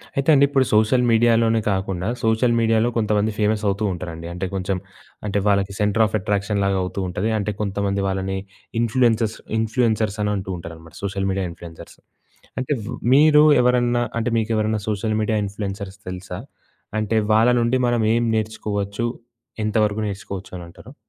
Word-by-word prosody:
అయితే 140 +2 0
అండి, 140 -1 +6
ఇప్పుడు 135 -2 +2
సోషల్ 110 +4 +4
మీడియాలోనే 115 0 +3
కాకుండా, 95 -1 -2 0.2
సోషల్ 115 +2 +2
మీడియాలో 115 0 +2
కొంతమంది 105 -1 +1
ఫేమసవుతూ 105 -1 0
ఉంటారండి. 85 -2 -7
అంటే, 90 +2 -3
కొంచెం 95 0 -1 0.5
అంటే 100 0 0
వాళ్ళకి 100 -1 +2
సెంటర్ 105 +2 +3
ఆఫ్ 110 - -2
అట్రాక్షన్ 100 +1 -1
లాగా 100 0 +1
అవుతూ 90 +2 -4
ఉంటది. 90 +4 -2
అంటే 105 0 -1
కొంతమంది 100 -1 -1
వాళ్ళని 95 0 -2 0.4
ఇన్‌ఫ్లుయెన్సర్స్ 115 -2 +2 0.2
ఇన్‌ఫ్లుయెన్సర్స్ 110 -2 0
అని 105 - 0
అంటూ 95 -1 -4
ఉంటారనమాట. 80 -1 -11
Social 95 0 -2
media 95 0 -1
influencers. 85 -1 -12 0.6
అంటే 130 +3 -1
వ్ - - -5 0.2
మీరు 150 +1 +6 0.2
ఎవరన్నా 120 -1 +2 0.2
అంటే, 115 - 0
మీకు 110 +1 -2
ఎవరైనా 110 0 0
సోషల్ 110 +1 -1
మీడియా 110 0 0
ఇన్‌ఫ్లుయెన్సర్స్ 100 -1 -6
తెలుసా? 90 -1 -6 0.6
అంటే 110 +1 -1 0.2
వాళ్ళ 110 +3 +5
నుండి 120 +2 +2
మనం 120 -1 +1
ఏం 120 +1 +2
నేర్చుకోవచ్చు? 105 0 -2 0.6
ఎంత 105 +1 -2
వరకు 105 +1 -2
నేర్చుకోవచ్చనంటారు? 95 -3 -8
105 Hz, 150 wpm, -22 LUFS, 95-115 Hz, 0.6 s, అండి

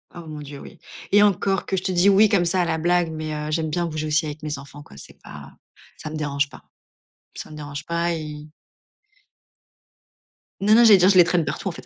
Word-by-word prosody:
Oh 170 -1 -9
mon 155 -1 -8
Dieu, 140 -1 -10
oui - - -13 0.3
et 205 +1 +5
encore 195 -1 +1
que 195 - -2
je 185 - -3
te 190 - -1
dis 180 +2 +2
oui 205 +2 +5
comme 185 -4 +2
ça 180 +2 +1
à - - +1
la 160 -1 -1
blague, 175 0 +1
mais, 155 -1 -5
heu, 150 0 -5
j'aime 160 0 -1
bien 170 +3 -1
bouger 155 -1 -4
aussi 155 +1 +1
avec 150 0 -7
mes 150 -1 -4
enfants 140 +1 -12
quoi, 70 - -16
c'est - - -14
pas 75 -1 -12 0.5
ça 155 - -8
me 155 - -7
dérange 145 -2 -2
pas, - - -15 0.7
ça - - -8
me 155 - -10
dérange 145 -2 -8
pas, 170 0 -1
ils 150 -1 -7 2.1
Non 210 +2 +3
non, 235 - +6
j'allais 215 -4 +8
dire, 185 +1 +4
je 190 - +4
les 175 - +9
traîne 175 -2 0
partout - - -4
en - - -1
fait. - - -11
160 Hz, 240 wpm, -22 LUFS, 150-180 Hz, 2.1 s, les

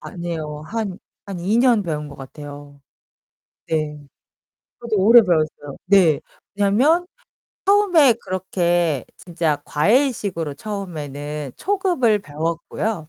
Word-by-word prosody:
아니에요. 160 -4 -6
한 215 -3 -4 0.3
한 195 -3 -6
2 200 +6 +1
년 240 -4 +4
배운 150 -4 -3
것 140 - -11
같아요. 145 +1 -11 0.9
네. 155 -2 -2 0.8
저도 235 -2 -2
오래 230 +5 +8
배웠어요. 155 -6 -1
네. 180 -6 +4 0.4
왜냐면 250 - +3 0.6
처음에 380 -9 +5
그렇게 175 - 0
진짜 165 -4 -2
과외식으로 200 - +1
처음에는 150 - -6
초급을 355 - +1
배웠고요. 165 +2 -3
175 Hz, 230 characters per minute, -21 LUFS, 150-220 Hz, 0.9 s, 오래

